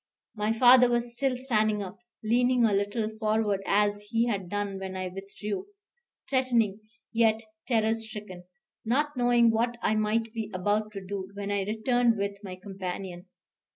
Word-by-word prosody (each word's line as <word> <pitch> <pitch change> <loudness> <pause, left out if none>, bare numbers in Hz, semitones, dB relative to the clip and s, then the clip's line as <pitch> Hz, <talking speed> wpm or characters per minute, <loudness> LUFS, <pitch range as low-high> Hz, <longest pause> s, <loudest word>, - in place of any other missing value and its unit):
My 210 0 0
father 245 +2 +7
was 240 0 0
still 260 0 0
standing 215 -5 +1
up, 190 +1 -9 0.2
leaning 245 +2 +3
a 215 - +2
little 205 +3 0
forward 215 -2 +1
as 205 0 +2
he 230 +1 +2
had 195 -6 -2
done 205 -1 -3
when 190 0 -5
I 185 0 -3
withdrew; 200 - -6 0.6
threatening, 240 -6 +1 0.3
yet 225 -1 +3 0.3
terror 225 -3 +2
stricken, 210 -5 -7 0.4
not 290 +6 0
knowing 240 -2 +4
what 235 +2 0
I - - +2
might 215 +1 0
be 220 -3 -4
about 210 +3 0
to 195 -2 -7
do, 190 0 -5
when 200 0 -4
I 200 -1 0
returned 230 +2 +2
with 200 0 -3
my 185 -2 -6
companion. 185 -1 -6
215 Hz, 155 wpm, -28 LUFS, 200-235 Hz, 0.6 s, father